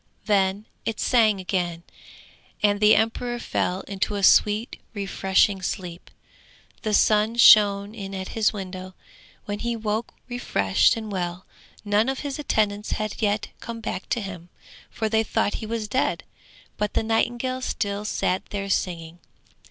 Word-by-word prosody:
Then 200 Hz, -1 st, +1 dB, 0.2 s
it 225 Hz, -1 st, -3 dB
sang 220 Hz, -5 st, +3 dB
again, 175 Hz, -3 st, -2 dB, 0.8 s
and 205 Hz, -1 st, +3 dB
the 210 Hz, 0 st, +6 dB
emperor 240 Hz, +3 st, 0 dB
fell 185 Hz, -5 st, -2 dB
into 200 Hz, +1 st, -3 dB
a 200 Hz, -, -3 dB
sweet 210 Hz, +4 st, +3 dB
refreshing 195 Hz, 0 st, +1 dB
sleep. 175 Hz, -1 st, -5 dB, 0.7 s
The 215 Hz, -2 st, +1 dB
sun 215 Hz, +2 st, +3 dB
shone 205 Hz, -3 st, +6 dB
in 195 Hz, -3 st, -7 dB
at 190 Hz, 0 st, -5 dB
his 220 Hz, -2 st, +1 dB
window, 185 Hz, -2 st, -7 dB, 0.5 s
when 205 Hz, 0 st, -4 dB
he 235 Hz, 0 st, -2 dB
woke 220 Hz, +1 st, -3 dB
refreshed 165 Hz, -, +2 dB
and 220 Hz, -2 st, -6 dB
well; 180 Hz, -1 st, -3 dB, 0.4 s
none 205 Hz, +4 st, +2 dB
of 270 Hz, -, -3 dB
his 285 Hz, 0 st, -4 dB
attendants 210 Hz, -7 st, 0 dB
had 215 Hz, +1 st, -4 dB
yet 205 Hz, -1 st, 0 dB
come 235 Hz, -1 st, -7 dB
back 215 Hz, -3 st, -5 dB
to 235 Hz, -, 0 dB
him, 180 Hz, -3 st, -8 dB, 0.4 s
for 220 Hz, -, -2 dB
they 220 Hz, 0 st, +2 dB
thought 205 Hz, -, 0 dB
he 220 Hz, -, -5 dB
was 225 Hz, -1 st, -3 dB
dead, 255 Hz, +6 st, 0 dB, 0.5 s
but 210 Hz, 0 st, -2 dB
the -, -, +2 dB
nightingale 240 Hz, +3 st, 0 dB
still 205 Hz, -4 st, -2 dB
sat 185 Hz, -3 st, -1 dB
there 200 Hz, -1 st, -4 dB
singing. 170 Hz, -2 st, -2 dB
210 Hz, 150 wpm, -24 LUFS, 190-225 Hz, 0.8 s, the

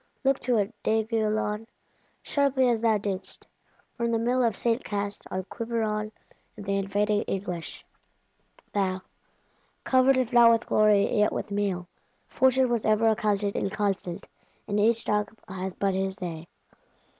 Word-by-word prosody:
Look 270 Hz, 0 st, +2 dB
to 245 Hz, -2 st, +1 dB
it, 210 Hz, +2 st, 0 dB
D'Aiguillon; 220 Hz, -1 st, 0 dB, 0.6 s
sharply 275 Hz, -2 st, +2 dB
as 230 Hz, -2 st, +1 dB
thou 225 Hz, -2 st, +3 dB
didst, 195 Hz, -2 st, -2 dB, 0.5 s
from 235 Hz, -1 st, -1 dB
the 230 Hz, -, +2 dB
Mill 245 Hz, +3 st, +1 dB
of 230 Hz, -4 st, +1 dB
St. 235 Hz, +1 st, 0 dB
Cast, 205 Hz, 0 st, -3 dB
on 185 Hz, 0 st, -3 dB
Quiberon 215 Hz, 0 st, -2 dB, 0.5 s
and 205 Hz, -, -8 dB
the 200 Hz, 0 st, 0 dB
invading 205 Hz, +2 st, +1 dB
English; 180 Hz, -4 st, -4 dB, 0.9 s
thou, 190 Hz, -2 st, 0 dB, 0.8 s
"covered 260 Hz, +1 st, +4 dB
if 255 Hz, -1 st, 0 dB
not 240 Hz, -1 st, +8 dB
with 230 Hz, 0 st, +3 dB
glory 210 Hz, -1 st, +3 dB
yet 210 Hz, -, +3 dB
with -, -, -4 dB
meal!" 195 Hz, -3 st, -1 dB, 0.4 s
Fortune 260 Hz, 0 st, +3 dB
was 235 Hz, -2 st, 0 dB
ever 215 Hz, +1 st, +3 dB
accounted 205 Hz, -2 st, 0 dB
inconstant: 195 Hz, -3 st, -2 dB, 0.4 s
and 205 Hz, 0 st, 0 dB
each 230 Hz, +2 st, +2 dB
dog 210 Hz, +1 st, -1 dB
has 190 Hz, -1 st, -5 dB
but 195 Hz, -1 st, 0 dB
his 190 Hz, 0 st, -1 dB
day. 170 Hz, -4 st, -6 dB
210 Hz, 145 wpm, -27 LUFS, 200-230 Hz, 0.9 s, not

